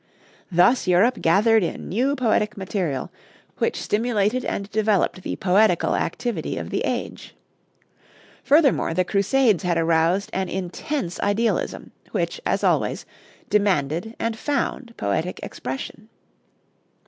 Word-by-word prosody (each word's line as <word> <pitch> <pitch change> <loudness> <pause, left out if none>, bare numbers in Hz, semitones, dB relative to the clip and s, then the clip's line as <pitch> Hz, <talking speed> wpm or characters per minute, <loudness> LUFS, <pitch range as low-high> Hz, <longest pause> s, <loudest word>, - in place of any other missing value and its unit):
Thus 185 +7 +4
Europe 200 +8 +3
gathered 215 +6 +4
in 175 - -3
new 260 +8 0
poetic 220 -5 +1
material, 185 -7 -3 0.5
which - - 0
stimulated 220 +2 0
and 200 - -3
developed 210 -3 +1
the - - -4
poetical 190 -1 +3
activity 240 +7 -2
of - - -5
the - - 0
age. - - -4 1.1
Furthermore, 280 - +3
the 185 +1 +2
Crusades 205 - +2
had 175 -2 0
aroused 165 +3 +2
an 190 0 -1
intense 190 - -4
idealism, 210 +3 -1 0.2
which, 485 - -2
as - - 0
always, - - +1 0.4
demanded 195 0 0
and 230 -1 -1
found 270 -4 -2
poetic 130 - -2
expression. 135 - -6
200 Hz, 115 wpm, -23 LUFS, 175-230 Hz, 1.1 s, Thus